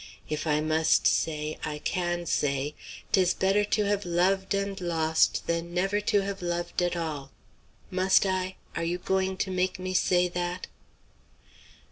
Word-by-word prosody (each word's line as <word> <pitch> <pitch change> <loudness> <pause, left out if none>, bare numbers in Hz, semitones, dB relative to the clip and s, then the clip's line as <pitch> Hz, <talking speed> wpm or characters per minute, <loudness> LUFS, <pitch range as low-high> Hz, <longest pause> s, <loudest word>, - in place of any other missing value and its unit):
If 150 +1 -3
I 150 0 +2
must 155 +1 +2
say, 155 -1 +1
I 150 -1 -3
can 175 +2 -2
say, 145 -2 0 0.4
''Tis 185 -2 +4
better 195 +2 +3
to 210 +1 +1
have 205 0 0
loved 190 +3 +1
and 200 -1 -2
lost 160 -2 +1
Than 170 +1 -2
never 195 +3 +1
to 205 -1 +2
have 195 -1 -4
loved 175 0 -2
at 175 0 0
all.' 155 -5 -4 0.6
Must 185 +2 +4
I? 185 0 -1 0.2
Are 170 - -1
you 170 +1 -1
going 190 +1 0
to 190 - -1
make 185 0 0
me 185 0 -4
say 180 -1 +3
that?" 175 +1 -3
180 Hz, 155 wpm, -28 LUFS, 165-190 Hz, 0.6 s, Tis